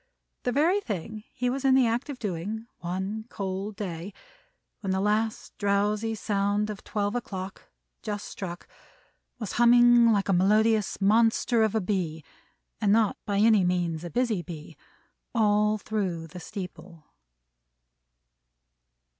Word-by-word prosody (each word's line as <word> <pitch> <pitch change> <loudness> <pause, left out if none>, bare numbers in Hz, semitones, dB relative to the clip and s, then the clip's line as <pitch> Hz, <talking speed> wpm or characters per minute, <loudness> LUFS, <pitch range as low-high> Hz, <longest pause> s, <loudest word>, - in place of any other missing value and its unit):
The 250 - -1
very 335 +10 +3
thing 215 - -5
he 250 -1 -2
was 265 +2 -1
in 265 -1 +5
the 260 -2 +5
act 235 +5 -1
of 280 - -5
doing 210 +1 -4
one 190 +5 -4
cold 195 +1 -4
day, 190 -1 -6 0.6
when 200 - -5
the 190 - +1
last 210 +2 -1
drowsy 210 +2 +1
sound 205 +1 0
of 205 - -9
Twelve 205 -1 -2
o'clock, 190 -5 -6 0.3
just 210 -2 -4
struck, 175 -3 -7 0.7
was 220 -5 -5
humming 240 0 +6
like 200 -2 +1
a 195 - +2
melodious 215 +3 +3
monster 225 +3 +3
of 220 -1 +2
a 220 - +2
Bee, 180 -5 -2 0.6
and 205 -2 +3
not 220 -1 +3
by 200 -1 0
any 215 -1 +5
means 175 -2 0
a 175 - -5
busy 235 -3 0
Bee, 160 -2 -9 0.6
all 210 -1 +3
through 195 -6 -3
the 165 +3 -10
steeple? 175 -3 -9
210 Hz, 140 wpm, -27 LUFS, 190-225 Hz, 0.7 s, humming